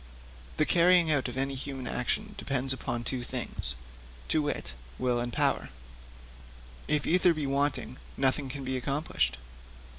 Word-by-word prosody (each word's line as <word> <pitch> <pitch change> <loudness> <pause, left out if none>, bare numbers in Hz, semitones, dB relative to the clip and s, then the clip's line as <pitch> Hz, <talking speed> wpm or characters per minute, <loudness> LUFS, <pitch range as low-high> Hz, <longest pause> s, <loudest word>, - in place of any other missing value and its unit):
'The 155 - +4
carrying 175 -1 +5
out 140 -4 +2
of 125 +1 -6
any 135 +1 0
human 135 -1 -5
action 210 - -1
depends 135 -1 -1
upon 120 -2 -3
two 125 +1 -1
things 95 - -2 0.5
to 155 - +3
wit, 145 - -3 0.2
will 125 -1 +1
and 120 0 -2
power; - - +1 1.2
if 150 -1 +1
either 180 0 +4
be 150 -2 -2
wanting, 140 -2 0 0.2
nothing 135 +1 +2
can 135 +1 -5
be 130 0 -2
accomplished. 130 - 0
135 Hz, 145 wpm, -29 LUFS, 125-150 Hz, 1.2 s, carrying